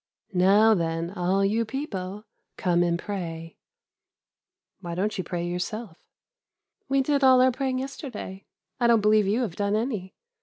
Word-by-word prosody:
"'Now, 200 +5 +5
then, 165 -2 -1
all 190 +2 +1
you 220 +4 +1
people, 210 -6 -5 0.3
come 175 -1 +2
and 170 -1 +2
pray.' 165 -5 -6 1.2
"'Why 170 -1 -6
don't 205 +4 -1
you 185 - -2
pray 175 0 -3
yourself?' 180 +2 -4 0.9
"'We 275 0 +3
did 285 0 +1
all 260 -1 +7
our 255 0 +5
praying 260 0 -2
yesterday; 255 -7 -7 0.3
I 240 - +3
don't 230 -2 +5
believe 210 -1 +4
you 215 +6 +1
have 190 -8 -4
done 205 0 0
any. 215 -5 -3
205 Hz, 150 wpm, -26 LUFS, 180-235 Hz, 1.2 s, all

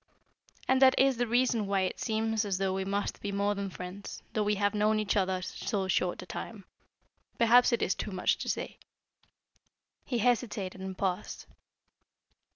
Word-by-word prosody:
"And 260 0 +3
that 260 -1 +6
is 270 -2 +4
the 245 0 0
reason 240 -3 +2
why 195 -1 +1
it 185 0 -2
seems 220 +2 0
as 200 -3 -1
though 190 0 0
we 190 0 -1
must 200 +1 -2
be 205 - -3
more 200 +1 +1
than 200 -1 -4
friends, 180 +2 -8
though 215 - 0
we 210 0 +1
have 205 +1 +1
known 215 +1 +2
each 210 0 0
other 190 -2 0
so 190 +1 -3
short 185 -1 0
a - - -11
time. 200 +1 -7 0.7
Perhaps 240 +2 +5
it 235 - +1
is - - +2
too - - -5
much 185 - 0
to - - -4
say." - - -3 1.2
He 245 - -2
hesitated, 215 -5 0
and 190 -1 -6
paused. 185 -2 -3
205 Hz, 175 wpm, -30 LUFS, 190-225 Hz, 1.2 s, that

